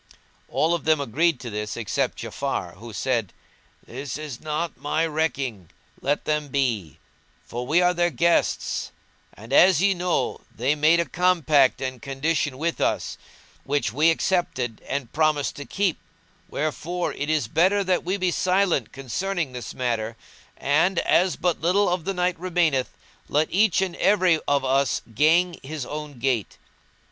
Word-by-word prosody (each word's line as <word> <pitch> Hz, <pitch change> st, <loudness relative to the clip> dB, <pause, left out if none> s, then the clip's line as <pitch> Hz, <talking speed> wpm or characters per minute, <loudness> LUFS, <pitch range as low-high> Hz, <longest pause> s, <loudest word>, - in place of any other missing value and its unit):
All 165 Hz, +2 st, +1 dB
of 170 Hz, -, -2 dB
them 155 Hz, -1 st, +3 dB
agreed 145 Hz, +3 st, +1 dB
to 120 Hz, -, -6 dB
this 105 Hz, 0 st, -4 dB
except 115 Hz, -4 st, -2 dB
Ja'afar -, -, -4 dB
who 115 Hz, +3 st, -10 dB
said,[FN#186] 115 Hz, -2 st, -1 dB, 0.6 s
"This 130 Hz, +2 st, -6 dB
is 150 Hz, -5 st, -7 dB
not 155 Hz, +2 st, -3 dB
my 155 Hz, +3 st, 0 dB
recking; 140 Hz, -, -2 dB, 0.3 s
let 145 Hz, +2 st, 0 dB
them 150 Hz, -1 st, 0 dB
be; 120 Hz, -, -1 dB, 0.5 s
for 120 Hz, +1 st, -5 dB
we 165 Hz, +5 st, +4 dB
are 180 Hz, 0 st, +4 dB
their 175 Hz, 0 st, +2 dB
guests 170 Hz, +4 st, +1 dB, 0.4 s
and, 115 Hz, +6 st, -9 dB
as 185 Hz, +3 st, +6 dB
ye 195 Hz, +2 st, +4 dB
know, 180 Hz, -1 st, -1 dB
they 130 Hz, +5 st, +1 dB
made 155 Hz, +3 st, +4 dB
a 170 Hz, -, +2 dB
compact 160 Hz, -7 st, +3 dB
and 130 Hz, -2 st, -4 dB
condition 140 Hz, +1 st, -1 dB
with 165 Hz, +3 st, -2 dB
us -, -, -1 dB, 0.4 s
which 140 Hz, -6 st, -1 dB
we 155 Hz, +5 st, +4 dB
accepted 155 Hz, -, 0 dB
and 135 Hz, -3 st, -3 dB
promised 155 Hz, -2 st, +1 dB
to 145 Hz, -, -6 dB
keep: 195 Hz, -4 st, -1 dB, 0.5 s
wherefore 165 Hz, +4 st, -2 dB
it 145 Hz, -, -4 dB
is 155 Hz, -7 st, +1 dB
better 185 Hz, -, +3 dB
that 185 Hz, -1 st, +1 dB
we 185 Hz, +3 st, -1 dB
be 185 Hz, -2 st, +1 dB
silent 180 Hz, -, +1 dB
concerning 155 Hz, +4 st, -3 dB
this 125 Hz, -3 st, -6 dB
matter; 115 Hz, -3 st, -2 dB, 0.4 s
and, 160 Hz, +6 st, +2 dB
as 180 Hz, +2 st, +3 dB
but 175 Hz, -2 st, -1 dB
little 185 Hz, +5 st, +3 dB
of 175 Hz, -2 st, -1 dB
the 195 Hz, -, -1 dB
night 180 Hz, -1 st, 0 dB
remaineth, 165 Hz, -7 st, +1 dB, 0.4 s
let 150 Hz, +2 st, +2 dB
each 200 Hz, 0 st, +3 dB
and 180 Hz, -3 st, -3 dB
every 185 Hz, -5 st, +3 dB
of 140 Hz, -1 st, +2 dB
us 135 Hz, +1 st, +1 dB
gang 165 Hz, +7 st, +3 dB
his 145 Hz, -1 st, -5 dB
own 150 Hz, -1 st, -6 dB
gait." 120 Hz, -4 st, -1 dB
155 Hz, 155 wpm, -24 LUFS, 130-175 Hz, 0.6 s, as